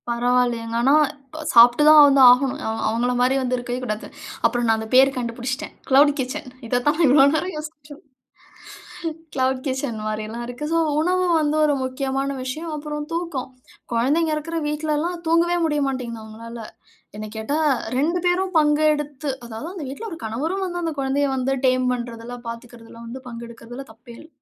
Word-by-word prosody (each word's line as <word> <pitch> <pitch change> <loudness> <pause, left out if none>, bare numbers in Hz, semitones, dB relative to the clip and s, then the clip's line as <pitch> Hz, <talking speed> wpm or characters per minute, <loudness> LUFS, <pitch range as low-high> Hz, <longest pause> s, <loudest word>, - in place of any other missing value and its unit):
பரவாயில்லயேங்க. 240 -1 0
ஆனா, 270 +4 +4 0.3
இப்ப 310 +3 -10
சாப்பிட்டு 240 +3 +7
தான் 310 0 +9
வந்து 275 -1 +5
ஆகணும். 255 +2 +3
அவ 220 - -2
அவங்கள 235 +3 0
மாரி 250 +2 +3
வந்து 255 -1 0
இருக்கவே 245 0 -4
கூடாது. 215 -3 -4 0.4
அப்புறம் 240 -1 +1
நான் 225 0 +3
அந்த 220 - -6
பேர் 265 +1 +7
கண்டுபிடிச்சுட்டேன். 245 +2 -4 0.2
க்ளவுட் 280 +2 +6
கிட்சன் 260 +2 -4 0.2
இத 245 +2 +1
தான் 295 - +3
நான் 335 - +4
இவ்ளோ 270 +1 +6
நேரம் 360 +4 -2
யோசிட்ருந்தேன். 300 -2 -10 1.2
க்ளவுட் 260 0 0
கிட்சன் 260 -4 -3
மாரில்லா 215 +2 -4
இருக்கு. 245 +5 -5
சோ, 330 - +3 0.2
உணவு 365 +3 +1 0.2
வந்து 300 0 0
ஒரு 295 -1 +2
முக்கியமான 270 +1 -2
விஷயம். 310 +6 -5
அப்புறம் 295 0 -5
தூக்கம். 330 -7 -3 0.4
கொழந்தைங்க 300 +7 +1
இருக்கிற 330 +2 -3
வீட்லல்லா 305 +2 -1 0.2
தூங்கவே 340 +2 +3
முடிய 295 -2 0
மாட்டேன்ங்கிது 240 -4 -4
அவங்களால. 230 +2 -9 0.6
என்ன 215 0 -6
கேட்டா 220 +8 -2 0.4
2 330 +6 +1
பேரும் 370 +1 +1
பங்கு 300 0 +3
எடுத்து. 295 -1 -5 0.2
அதாவது, 230 +7 -7
அந்த 340 -6 -6
வீட்ல 280 +12 -7
ஒரு 330 - -7
கணவரும் 315 - -2
வந்து, 350 -1 -4
அந்த 330 -1 -2
கொழந்தைய 275 +1 0
வந்து 260 +1 0 0.2
டேம் 255 0 +1
பண்றதிலா 240 0 -6
பார்த்துக்கிறதுல 230 -1 -10
வந்து 245 +3 -7
பங்கு 235 -1 -8
எடுக்கிறதுல 235 +3 -10
தப்பே 235 +1 -15
இல்ல. 315 - -14
265 Hz, 165 wpm, -22 LUFS, 240-300 Hz, 1.2 s, தான்